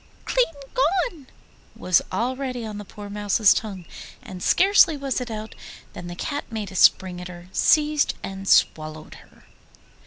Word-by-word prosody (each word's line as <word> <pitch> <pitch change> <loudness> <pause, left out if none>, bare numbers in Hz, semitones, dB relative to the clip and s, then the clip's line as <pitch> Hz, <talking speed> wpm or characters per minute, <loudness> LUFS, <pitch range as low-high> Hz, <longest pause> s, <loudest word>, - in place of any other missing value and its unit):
'Clean - - +2 0.3
gone' 325 - 0 0.5
was 180 -2 +2
already 250 +3 -3
on 210 -1 -6
the - - -7
poor 205 +1 -11
Mouse's 205 0 +3
tongue, 195 -5 -5 0.4
and 185 -2 -9
scarcely 375 - +4
was 275 -2 -2
it 245 - -5
out 220 -1 -6 0.4
than 175 - -8
the 175 - -7
Cat 285 - -5
made 215 -3 -5
a - - -11
spring 180 -1 +3
at 180 - -7
her, 175 0 -12
seized 300 +4 +2
and 195 0 -7
swallowed 155 -3 +1
her. - - -23
215 Hz, 155 wpm, -23 LUFS, 185-275 Hz, 0.5 s, scarcely